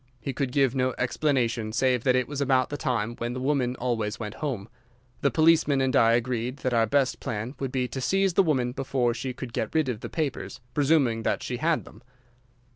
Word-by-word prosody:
He 135 Hz, +4 st, -4 dB
could 135 Hz, -2 st, -2 dB
give 135 Hz, -2 st, +2 dB
no 130 Hz, -1 st, 0 dB
explanation 125 Hz, -5 st, 0 dB
save 125 Hz, 0 st, +1 dB
that 125 Hz, -1 st, +4 dB
it 130 Hz, -2 st, +1 dB
was 145 Hz, -1 st, -4 dB
about 130 Hz, -2 st, +2 dB
the 145 Hz, -, -3 dB
time 120 Hz, -5 st, -1 dB
when 120 Hz, +1 st, -3 dB
the 130 Hz, -, -4 dB
woman 130 Hz, -2 st, 0 dB
always 115 Hz, -4 st, -2 dB
went 105 Hz, -2 st, -5 dB
home. 120 Hz, -9 st, -3 dB, 0.5 s
The 140 Hz, -, +3 dB
policeman 155 Hz, 0 st, +4 dB
and 130 Hz, -1 st, +1 dB
I 115 Hz, 0 st, +5 dB
agreed 120 Hz, +1 st, -1 dB
that 130 Hz, -, +1 dB
our 115 Hz, -1 st, +3 dB
best 135 Hz, +3 st, +1 dB
plan 115 Hz, +3 st, -4 dB
would 135 Hz, -2 st, -3 dB
be 130 Hz, -1 st, 0 dB
to 130 Hz, -, -5 dB
seize 195 Hz, +5 st, +2 dB
the 190 Hz, -, +5 dB
woman 130 Hz, -8 st, +1 dB
before 130 Hz, -2 st, 0 dB
she 130 Hz, +2 st, -4 dB
could 125 Hz, -1 st, -8 dB
get 110 Hz, -, -3 dB
rid 155 Hz, -4 st, +2 dB
of 115 Hz, -4 st, -3 dB
the -, -, -7 dB
papers, 155 Hz, -6 st, -3 dB
presuming 140 Hz, -6 st, +2 dB
that -, -, -1 dB
she -, -, -3 dB
had -, -, 0 dB
them. -, -, -15 dB
130 Hz, 215 wpm, -26 LUFS, 120-140 Hz, 0.5 s, I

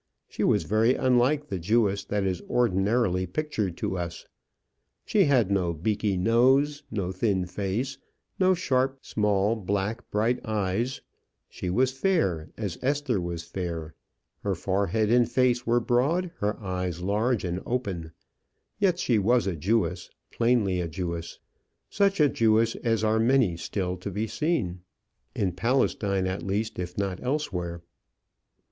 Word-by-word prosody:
She -, -, -4 dB
was 105 Hz, -, +3 dB
very 110 Hz, +7 st, +3 dB
unlike 130 Hz, +3 st, +2 dB
the 95 Hz, -9 st, -4 dB
Jewess 100 Hz, +2 st, +1 dB
that 105 Hz, -1 st, -1 dB
is 95 Hz, -2 st, -1 dB
ordinarily 100 Hz, -4 st, +1 dB
pictured 105 Hz, -, -2 dB
to 95 Hz, -, -2 dB
us. 85 Hz, -1 st, -5 dB, 0.8 s
She -, -, +3 dB
had 125 Hz, -9 st, +3 dB
no 90 Hz, -4 st, +1 dB
beaky 100 Hz, +4 st, -1 dB
nose, 130 Hz, +8 st, +3 dB
no 95 Hz, -4 st, -2 dB
thin 95 Hz, -1 st, 0 dB
face, 105 Hz, +9 st, -3 dB, 0.4 s
no 185 Hz, 0 st, +4 dB
sharp, 135 Hz, -5 st, 0 dB
small, 105 Hz, +1 st, +1 dB
black, 100 Hz, +3 st, -3 dB
bright 115 Hz, +4 st, 0 dB
eyes; 110 Hz, +4 st, -1 dB, 0.5 s
she 90 Hz, -, -5 dB
was 125 Hz, +8 st, +2 dB
fair, 135 Hz, -, 0 dB
as 100 Hz, -6 st, -4 dB
Esther 135 Hz, -6 st, 0 dB
was 85 Hz, -1 st, -4 dB
fair; 85 Hz, -3 st, -5 dB, 0.5 s
her 100 Hz, -2 st, -1 dB
forehead 100 Hz, +4 st, 0 dB
and 120 Hz, -1 st, +4 dB
face 125 Hz, -2 st, +2 dB
were 120 Hz, +1 st, +4 dB
broad, 145 Hz, +10 st, +1 dB
her 105 Hz, +1 st, -1 dB
eyes 90 Hz, -3 st, -3 dB
large 110 Hz, +4 st, +1 dB
and 90 Hz, 0 st, -2 dB
open; 95 Hz, -10 st, -3 dB, 0.7 s
yet 190 Hz, -4 st, +3 dB
she 120 Hz, -10 st, +2 dB
was 120 Hz, +3 st, +3 dB
a 95 Hz, -3 st, -1 dB
Jewess, 90 Hz, +1 st, 0 dB, 0.2 s
plainly 115 Hz, -6 st, +2 dB
a 85 Hz, -, -2 dB
Jewess; 85 Hz, 0 st, -5 dB, 0.5 s
such 200 Hz, -1 st, +2 dB
a 150 Hz, -, +6 dB
Jewess 115 Hz, -2 st, +3 dB
as 115 Hz, -3 st, 0 dB
are 110 Hz, +1 st, +2 dB
many 115 Hz, -6 st, +3 dB
still 90 Hz, +2 st, -3 dB
to 90 Hz, +3 st, -6 dB
be 105 Hz, +3 st, -2 dB
seen 110 Hz, -, -1 dB, 0.6 s
in 95 Hz, -3 st, 0 dB
Palestine, 100 Hz, -2 st, +1 dB
at 95 Hz, +1 st, -2 dB
least, 105 Hz, +2 st, -2 dB
if 90 Hz, 0 st, -5 dB
not 95 Hz, -2 st, -2 dB
elsewhere. 90 Hz, -, -3 dB
105 Hz, 145 wpm, -27 LUFS, 90-125 Hz, 0.8 s, a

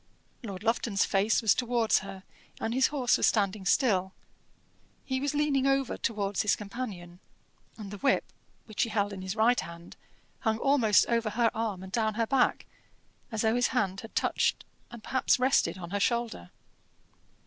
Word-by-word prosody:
Lord 200 Hz, -5 st, -7 dB
Lufton's 225 Hz, -3 st, +1 dB
face 205 Hz, +4 st, +1 dB
was 215 Hz, -, +5 dB
towards 240 Hz, -2 st, +1 dB
her, 195 Hz, -1 st, -9 dB, 0.4 s
and 225 Hz, -, -2 dB
his 260 Hz, +1 st, +4 dB
horse 265 Hz, -5 st, +1 dB
was -, -, +3 dB
standing 200 Hz, -2 st, 0 dB
still; 190 Hz, -7 st, +2 dB, 0.9 s
he 260 Hz, -1 st, -1 dB
was 285 Hz, +1 st, -1 dB
leaning 285 Hz, -2 st, +1 dB
over 270 Hz, -2 st, +1 dB
towards 205 Hz, -3 st, -1 dB
his 210 Hz, -, +2 dB
companion, 195 Hz, -5 st, -7 dB, 0.6 s
and 205 Hz, -3 st, -8 dB
the 205 Hz, -, -8 dB
whip, 275 Hz, -, +2 dB, 0.4 s
which 215 Hz, -2 st, -4 dB
he 230 Hz, -, +1 dB
held 205 Hz, -1 st, -1 dB
in 190 Hz, -, -7 dB
his 190 Hz, +2 st, -4 dB
right 235 Hz, +3 st, +3 dB
hand, 170 Hz, +1 st, -9 dB, 0.4 s
hung 220 Hz, -2 st, 0 dB
almost 240 Hz, -5 st, +4 dB
over 230 Hz, -2 st, 0 dB
her 230 Hz, +2 st, +1 dB
arm 215 Hz, -5 st, -3 dB
and 190 Hz, -, -10 dB
down 220 Hz, 0 st, 0 dB
her 230 Hz, 0 st, +1 dB
back, 265 Hz, +2 st, +1 dB, 0.7 s
as 220 Hz, -1 st, -2 dB
though 220 Hz, 0 st, +3 dB
his 245 Hz, 0 st, +3 dB
hand 195 Hz, -3 st, 0 dB
had 225 Hz, -, -12 dB
touched -, -, 0 dB, 0.2 s
and 235 Hz, -2 st, -11 dB
perhaps 260 Hz, -, +2 dB
rested 255 Hz, -5 st, +2 dB
on 175 Hz, -1 st, -8 dB
her 205 Hz, -, -1 dB
shoulder. 235 Hz, -, -1 dB
220 Hz, 170 wpm, -29 LUFS, 195-245 Hz, 0.9 s, was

